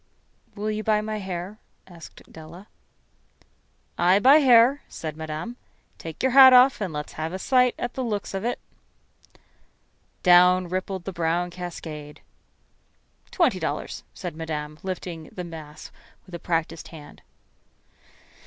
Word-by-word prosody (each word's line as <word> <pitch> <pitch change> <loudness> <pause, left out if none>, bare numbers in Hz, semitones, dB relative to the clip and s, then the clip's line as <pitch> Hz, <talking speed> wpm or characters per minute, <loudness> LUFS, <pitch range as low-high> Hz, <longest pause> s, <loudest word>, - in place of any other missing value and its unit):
"Will 210 +1 -3
you 215 0 -4
buy 215 -1 +2
my 215 0 -4
hair?" 190 +2 -6 0.3
asked 170 -3 -14
Della. 165 +5 -12 1.3
"I 180 +2 +4
buy 265 +8 +6
hair," 260 -1 +5
said 155 -2 -6
Madame. 160 +9 -6 0.4
"Take 160 +5 -8
yer 260 - +2
hat 260 0 +9
off 250 -1 +6
and 190 -4 -2
let's 150 -1 -6
have 160 +1 -4
a - - -3
sight 250 +4 +2
at 245 - -4
the 260 - -3
looks 210 -5 -4
of 195 +1 -4
it." 240 +1 -1 1.7
Down 180 0 +5
rippled 185 0 -4
the 195 - -5
brown 170 +1 -1
cascade. 160 -4 -8 1.1
"Twenty - - +1
dollars," - - -4
said - - -7
Madame, 155 -1 -6
lifting 180 -3 -6
the 180 - -8
mass 155 -3 -10 0.3
with 185 - -17
a 170 - -5
practiced 165 -2 -3
hand. 150 -3 -13
180 Hz, 135 wpm, -24 LUFS, 160-215 Hz, 1.7 s, hat